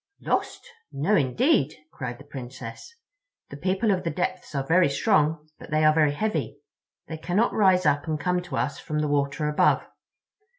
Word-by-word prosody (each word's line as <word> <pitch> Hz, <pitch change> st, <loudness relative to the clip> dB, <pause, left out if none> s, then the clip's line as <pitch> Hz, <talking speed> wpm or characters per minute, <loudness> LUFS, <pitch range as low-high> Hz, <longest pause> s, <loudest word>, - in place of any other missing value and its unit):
"Lost? -, -, -2 dB, 0.2 s
No, 155 Hz, +10 st, +1 dB
indeed," 150 Hz, -, +2 dB, 0.2 s
cried 125 Hz, -3 st, -6 dB
the 140 Hz, -, -13 dB
Princess. 130 Hz, -, -9 dB, 0.6 s
"The 140 Hz, -, -7 dB
People 190 Hz, +7 st, +1 dB
of 185 Hz, -2 st, 0 dB
the 170 Hz, -, -1 dB
Depths 180 Hz, -2 st, -3 dB
are 135 Hz, -1 st, -1 dB
very 170 Hz, +1 st, +4 dB
strong, 155 Hz, -1 st, +1 dB
but -, -, -11 dB
they 155 Hz, 0 st, +1 dB
are 155 Hz, -, +6 dB
very 155 Hz, -2 st, +3 dB
heavy. 215 Hz, +8 st, -2 dB, 0.5 s
They 160 Hz, -, -6 dB
cannot 180 Hz, +8 st, 0 dB
rise 190 Hz, -4 st, +3 dB
up 145 Hz, +1 st, +2 dB
and 155 Hz, -1 st, -1 dB
come 180 Hz, +2 st, 0 dB
to 170 Hz, -7 st, -6 dB
us 145 Hz, -, -2 dB
from 150 Hz, -2 st, -4 dB
the 150 Hz, 0 st, 0 dB
water 145 Hz, +1 st, 0 dB
above. 150 Hz, -, +2 dB
155 Hz, 175 wpm, -25 LUFS, 145-185 Hz, 0.6 s, are